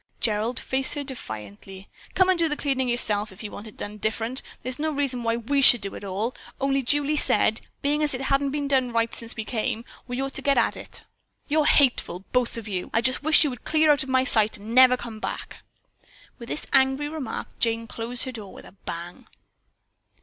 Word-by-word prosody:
Gerald 220 +2 0
faced 265 0 +1
her 290 - -2
defiantly. 190 - -8 0.3
"Come 375 - +4
and 370 -2 +3
do 330 -1 +3
the 295 - -2
cleaning 265 -3 0
yourself 215 -3 +1
if 190 +4 -11
you 210 - -6
want 205 - -8
it 215 - -13
done 210 +1 -5
different. 225 +4 -2 0.2
There's 255 +1 -3
no 310 +1 0
reason 275 -4 -1
why 230 0 0
we 275 +5 0
should 245 -4 +7
do 195 -1 -5
it - - -6
at - - -11
all, 200 +5 -2 0.3
only 275 0 +1
Julie 290 +3 +1
said, 220 -5 +3 0.2
being 295 +2 +1
as 295 -3 +4
it 250 - -5
hadn't 275 +1 +1
been 285 0 -2
done 260 -3 +1
right 230 0 0
since 230 0 -5
we 220 - -4
came, 225 0 -2 0.2
we'd 245 0 -4
ought 270 0 -3
to - - -3
get 280 0 +2
at - - +2
it." - - -8 0.4
"You're 305 0 +2
just - - +5
hateful, 220 -9 +2
both 250 -2 0
of 225 -2 -6
you! 185 -3 -3
I 230 - +3 0.2
wish 310 +1 +5
you 295 - 0
would 245 - -9
clear 310 -1 +4
out 290 0 +3
of 265 - -5
my 260 0 +3
sight 220 -4 +3
and 210 +3 -8
never 255 0 +7
come 230 -3 -8
back!" - - -5 0.8
With 235 - -9
this - - -2
angry 265 +2 +3
remark, 295 -6 -5
Jane 230 0 +1
closed 235 +2 -4
her 260 - -4
door 215 -5 -8
with - - -12
a - - -13
bang. 175 -2 -8
250 Hz, 225 wpm, -25 LUFS, 220-275 Hz, 0.8 s, should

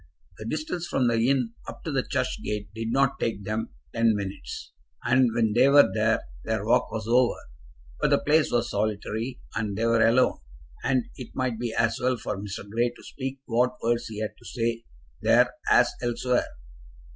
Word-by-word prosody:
The 110 - -7
distance 155 +5 -3
from 130 -2 +1
the 115 +1 +2
inn 125 -4 +1
up 115 - -9
to 160 - -3
the 135 -2 +1
church 130 -1 -2
gate 105 0 -4
did 115 +1 -3
not 135 +1 +2
take 105 -3 -2
them 110 +3 -2 0.2
ten 115 -1 +3
minutes, 100 -1 -6 0.3
and 125 +1 +4
when 110 -3 +2
they 125 +4 +5
were 145 +1 +7
there 110 +1 +2 0.2
their 110 -2 -2
walk 115 - +2
was 110 -2 -4
over. 120 +1 +3 0.6
But - - +2
the - - +5
place 155 +1 +3
was 120 -1 +1
solitary, 110 +3 -2 0.2
and 105 -2 -2
they 115 - 0
were 115 -1 +4
alone; 120 +3 +3 0.4
and 130 -3 +2
it 125 -3 -9
might 125 -4 -1
be 120 -1 -2
as 115 0 +1
well 125 0 +1
for 105 - -4
Mr. 100 +1 -6
Grey 115 +4 +1
to 120 - -16
speak 135 0 -6
what 125 +2 +1
words 115 0 +1
he 105 -1 -6
had 110 - -3
to - - -19
say 115 -1 -2 0.4
there - - +4 0.2
as - - +5
elsewhere. 120 +1 0
115 Hz, 190 wpm, -26 LUFS, 110-125 Hz, 0.6 s, were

